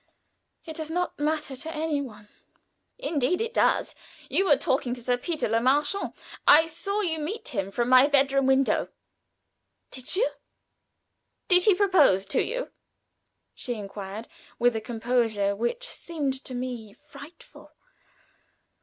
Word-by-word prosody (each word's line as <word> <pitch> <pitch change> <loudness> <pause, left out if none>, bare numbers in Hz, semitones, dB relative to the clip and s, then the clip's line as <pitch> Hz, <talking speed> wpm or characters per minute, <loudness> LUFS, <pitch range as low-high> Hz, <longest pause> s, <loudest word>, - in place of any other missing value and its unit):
"It 320 -2 -7
does 315 -1 -5
not 355 0 -2
matter 300 -2 -1
to 320 +5 -6
any 305 -2 -1
one." 210 -6 -10 0.7
"Indeed 330 - 0
it 455 +2 -2
does. - - +2 0.4
You 390 - +2
were 295 -6 +5
talking 255 -2 0
to 245 - -9
Sir 245 +1 +2
Peter 315 +6 -2
Le 225 +1 +1
Marchant. 290 +10 +1 0.3
I 315 +2 +8
saw 390 +6 -3
you 325 -5 -1
meet 385 +10 -4
him 195 -4 -2
from 240 +4 -1
my 255 +2 +7
bedroom 275 -1 +3
window." 265 0 +2 1.0
"Did 255 +4 -4
you?" 465 +6 +3 1.2
"Did 360 -1 +5
he 415 -4 +6
propose 355 - +4
to 195 - 0
you?" - - -3 0.8
she 245 - -5
inquired, 205 +1 -7 0.3
with 245 -1 +3
a 220 - -2
composure 225 -3 0
which 240 - -2
seemed 285 -5 -3
to 255 - -6
me 245 -4 -5
frightful. 310 - -14
275 Hz, 140 wpm, -26 LUFS, 240-335 Hz, 1.2 s, I